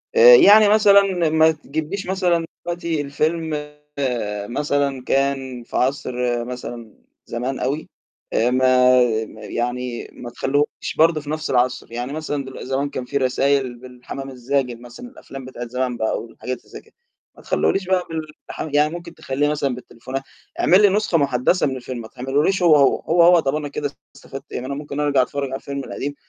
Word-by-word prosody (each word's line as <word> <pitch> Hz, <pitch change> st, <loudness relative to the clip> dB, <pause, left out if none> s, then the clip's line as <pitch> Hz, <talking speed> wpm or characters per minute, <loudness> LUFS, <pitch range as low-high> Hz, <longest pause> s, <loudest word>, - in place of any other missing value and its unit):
آآ 485 Hz, +1 st, +10 dB
يعني 210 Hz, -, +7 dB
مثلًا 200 Hz, -5 st, +4 dB
ما 160 Hz, 0 st, +5 dB
تجبليش 160 Hz, +5 st, -5 dB
مثلًا 180 Hz, -3 st, +1 dB, 0.2 s
دلوقتي 170 Hz, -3 st, -2 dB
الفيلم 150 Hz, +1 st, -2 dB, 0.8 s
مثلًا 140 Hz, -2 st, 0 dB
كان 135 Hz, -3 st, -1 dB
في -, -, -5 dB
عصر 125 Hz, -2 st, -1 dB
مثلًا 120 Hz, -3 st, -7 dB, 0.3 s
زمان 125 Hz, +3 st, -3 dB
أوي، 140 Hz, +5 st, -2 dB, 0.4 s
آآ 120 Hz, +2 st, +2 dB
ما 130 Hz, 0 st, +5 dB, 0.3 s
ما 110 Hz, 0 st, -13 dB
يعني 120 Hz, +1 st, -3 dB
ما 120 Hz, -, -8 dB
تخلّيهوش 145 Hz, +4 st, -2 dB
برضه 160 Hz, -1 st, +4 dB
في 145 Hz, -, -10 dB
نفس 155 Hz, 0 st, -3 dB
العصر، 125 Hz, -1 st, 0 dB
يعني 120 Hz, +4 st, -4 dB
مثلًا 145 Hz, -3 st, -3 dB
دلو 130 Hz, -, -9 dB
زمان 135 Hz, +2 st, -1 dB
كان 130 Hz, -3 st, -5 dB
في 140 Hz, +3 st, -2 dB
رسايل 135 Hz, -1 st, +1 dB
بالحمام 130 Hz, +2 st, -8 dB
الزاجل 125 Hz, -1 st, -2 dB
مثلًا، 120 Hz, -, -11 dB
الأفلام 135 Hz, -, -11 dB
بتاعة 120 Hz, -2 st, -7 dB
زمان 125 Hz, 0 st, -2 dB
بقى، 110 Hz, -, -1 dB
والحاجات 125 Hz, +2 st, -6 dB
اللي -, -, -26 dB
زَي -, -, -10 dB
كده -, -, -27 dB, 0.4 s
ما -, -, -16 dB
تخلّيهوليش 195 Hz, -1 st, 0 dB
بقى 185 Hz, -1 st, +1 dB
بالح 155 Hz, -2 st, -7 dB
يعني 150 Hz, +2 st, +3 dB
ممكن 170 Hz, -1 st, -8 dB
تخلّيه 145 Hz, +2 st, -1 dB
مثلًا 140 Hz, -4 st, -1 dB
بالتليفونات. 130 Hz, +2 st, -7 dB, 0.4 s
اعمل 185 Hz, +4 st, +5 dB
لي 205 Hz, -, +6 dB
نسخة 205 Hz, -3 st, +1 dB
مُحدثة 140 Hz, +4 st, +2 dB
من 130 Hz, -, -3 dB
الفيلم، 125 Hz, -1 st, -6 dB
ما 110 Hz, -, -9 dB
تعملهوليش 145 Hz, +10 st, 0 dB
هو، 160 Hz, -3 st, +7 dB
هو. 140 Hz, -2 st, +4 dB
هو، 170 Hz, +1 st, +3 dB
هو 175 Hz, 0 st, +7 dB
طب 140 Hz, -1 st, 0 dB
أنا 150 Hz, -1 st, -3 dB
كده 145 Hz, 0 st, -4 dB, 0.2 s
استفدت 135 Hz, +2 st, -11 dB
إيه؟ -, -, -3 dB
ما 130 Hz, -, -6 dB
أنا 140 Hz, -, -3 dB
ممكن 145 Hz, 0 st, -6 dB
أرجع 145 Hz, -3 st, +3 dB
أتفرج 140 Hz, +3 st, -2 dB
على 135 Hz, -, -4 dB
الفيلم 140 Hz, 0 st, -5 dB
القديم، 145 Hz, +1 st, -5 dB
140 Hz, 175 wpm, -21 LUFS, 125-160 Hz, 0.8 s, آآ